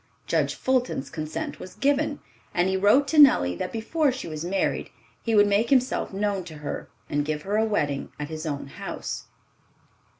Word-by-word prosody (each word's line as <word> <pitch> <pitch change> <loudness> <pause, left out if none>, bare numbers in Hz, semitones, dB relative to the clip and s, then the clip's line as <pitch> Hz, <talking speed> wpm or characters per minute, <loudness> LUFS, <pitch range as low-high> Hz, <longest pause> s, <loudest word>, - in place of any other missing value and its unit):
Judge - - +1
Fulton's 255 - 0
consent 155 -1 -4
was 185 - -9
given, 285 +1 +1 0.3
and 175 +1 +3
he 190 - +1
wrote 205 +9 +4
to 300 +3 +2
Nellie 90 - +7
that - - -3
before 280 +6 +1
she 255 -6 -6
was 155 -1 -5
married 190 +2 -1 0.3
he 225 -1 0
would 205 -1 +7
make 205 +3 +2
himself 260 -1 +2
known 200 -1 -1
to 160 - -9
her, 150 -1 -5 0.2
and 145 0 0
give 150 0 -3
her 200 +2 -1
a 220 +1 +3
wedding 145 -10 -1
at 150 - -4
his 160 0 -5
own 145 -2 -3
house. 135 - -6
200 Hz, 185 wpm, -26 LUFS, 155-250 Hz, 0.3 s, Nellie